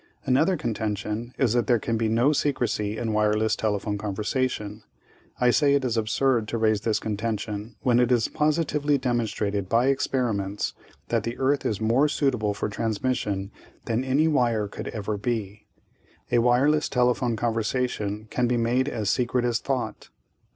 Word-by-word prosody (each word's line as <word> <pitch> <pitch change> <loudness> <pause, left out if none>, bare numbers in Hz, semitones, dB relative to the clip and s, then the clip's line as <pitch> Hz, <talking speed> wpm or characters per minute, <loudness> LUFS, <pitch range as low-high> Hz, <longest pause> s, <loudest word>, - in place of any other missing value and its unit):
"Another 160 +8 +3
contention 110 -1 -3
is 125 -5 +2
that 120 -3 +1
there 120 - +4
can 115 +1 -2
be 110 0 0
no 120 +7 +3
secrecy 115 -7 -1
in 115 -1 -2
wireless 105 0 +2
telephone 105 -1 -1
conversation. 105 +1 -2 0.6
I 125 -1 +4
say 140 +1 +3
it 140 -2 +1
is 120 -2 0
absurd 115 +1 +1
to 115 - -2
raise 110 -2 +2
this 110 -1 +1
contention 110 0 -4
when 120 -1 +3
it 125 0 +2
is 120 -3 +3
positively 150 -1 +1
demonstrated 110 -6 -1
by 120 +3 +3
experiments 110 -7 -1 0.4
that - - +1
the 115 +1 -4
earth 135 +1 +1
is 105 - -2
more 120 +7 +3
suitable 125 -9 0
for - - -2
transmission 105 -2 -2 0.3
than 115 +2 0
any 135 +4 +2
wire 120 -8 +1
could - - -7
ever 105 -1 -3
be. 105 -3 -3 0.6
A 120 - +4
wireless 130 +6 +3
telephone 125 -1 +1
conversation 110 -2 -1
can 125 -1 +1
be 120 0 +1
made 120 +4 +1
as 110 -3 -3
secret 125 0 0
as 120 -1 +1
thought. 130 -3 -3
115 Hz, 160 wpm, -25 LUFS, 105-130 Hz, 0.6 s, there